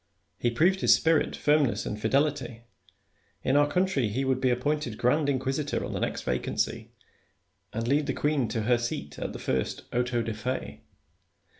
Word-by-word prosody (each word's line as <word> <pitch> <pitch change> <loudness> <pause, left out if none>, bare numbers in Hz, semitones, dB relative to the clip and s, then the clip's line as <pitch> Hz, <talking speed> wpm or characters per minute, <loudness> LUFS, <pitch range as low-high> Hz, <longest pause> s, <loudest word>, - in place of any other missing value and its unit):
He 120 - +2
proved 175 +10 +2
his - - +6
spirit, 160 -2 +2
firmness, 150 -4 +2
and 105 0 -4
fidelity: 130 -1 0 0.8
in 130 - +2
our 145 0 +5
country 180 -7 +1
he 130 +6 -1
would 130 -1 0
be 130 - +3
appointed 125 -1 -1
grand 145 +4 +2
inquisitor 135 +2 -1
on - - -5
the - - -2
next - - -2
vacancy, 60 0 -2 0.8
and 115 +1 -3
lead 145 +3 +2
the - - 0
queen 145 -5 0
to 110 0 -2
her 120 +2 +3
seat 75 -11 -4
at - - -3
the - - -7
first 65 -1 -2
auto 120 -1 0
da 115 0 -3
fe. 125 +5 -4
130 Hz, 170 wpm, -28 LUFS, 120-145 Hz, 0.8 s, his